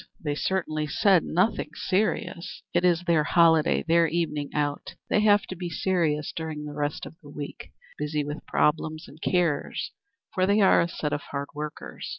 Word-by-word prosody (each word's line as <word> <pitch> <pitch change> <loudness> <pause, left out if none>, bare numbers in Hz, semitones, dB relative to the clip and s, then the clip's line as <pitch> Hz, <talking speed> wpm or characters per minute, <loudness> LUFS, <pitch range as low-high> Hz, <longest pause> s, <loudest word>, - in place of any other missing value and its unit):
They 150 -2 -2
certainly 155 -2 -1
said 185 +4 +4
nothing 185 +7 +1
serious." 185 -3 -1
"It - - +2
is 175 -1 +3
their 165 -3 +3
holiday 160 0 +4
their 165 0 +4
evening 155 -3 -1
out. 145 -1 -2 0.2
They - - +4
have 205 -1 +5
to 185 - -7
be 175 0 -5
serious 160 -4 0
during 155 -2 -4
the 150 - -6
rest 145 0 -2
of - - -9
the 145 - -13
week 145 0 -8 0.3
busy 150 0 -1
with 145 +1 -6
problems 155 +1 0
and 155 +3 -15
cares, 170 -5 0 0.4
for 185 0 +2
they 200 +2 +3
are 195 - +6
a 170 - +1
set 150 -3 -3
of 145 - -1
hard 140 0 -4
workers. 150 0 -6
160 Hz, 175 wpm, -26 LUFS, 150-180 Hz, 0.4 s, are